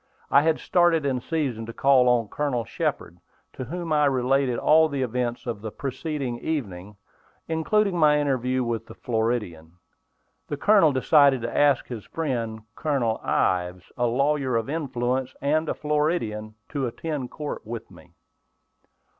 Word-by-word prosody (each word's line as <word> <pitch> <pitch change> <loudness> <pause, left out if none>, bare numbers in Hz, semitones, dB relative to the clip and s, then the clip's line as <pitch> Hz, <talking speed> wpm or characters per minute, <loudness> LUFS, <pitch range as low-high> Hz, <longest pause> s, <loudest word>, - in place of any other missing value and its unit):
I 140 - +6
had 160 +1 +2
started 175 -4 +2
in 130 -3 0
season 130 -9 -2
to 115 - -7
call 130 -1 +4
on 120 -3 +2
Colonel 125 -1 -2
Shepard, 85 -3 -3 0.3
to 130 - -6
whom 165 +3 -4
I 150 -1 +4
related 130 -1 +1
all 160 +4 +4
the 140 -2 -1
events 120 +1 -2
of 115 -5 -4
the 110 - -4
preceding 135 0 -4
evening, 105 - -4 0.5
including 185 +5 +1
my 150 -1 +5
interview 130 -3 0
with 115 -1 -3
the - - -11
Floridian. 110 -9 -2 0.7
The 145 - -4
Colonel 195 -2 +5
decided 140 -1 +4
to 120 - -4
ask 145 -3 +3
his 115 -5 -7
friend, 120 -8 -3
Colonel 130 -8 -1
Ives, 90 0 -1
a 120 - +1
lawyer 135 +1 +1
of 115 +4 -1
influence, 130 -4 -2
and 155 +3 0
a - - -1
Floridian, 150 -9 -1
to 140 -3 -2
attend 140 +1 -4
court 150 -1 -6
with 115 0 -7
me. - - -17
130 Hz, 150 wpm, -25 LUFS, 115-150 Hz, 0.7 s, I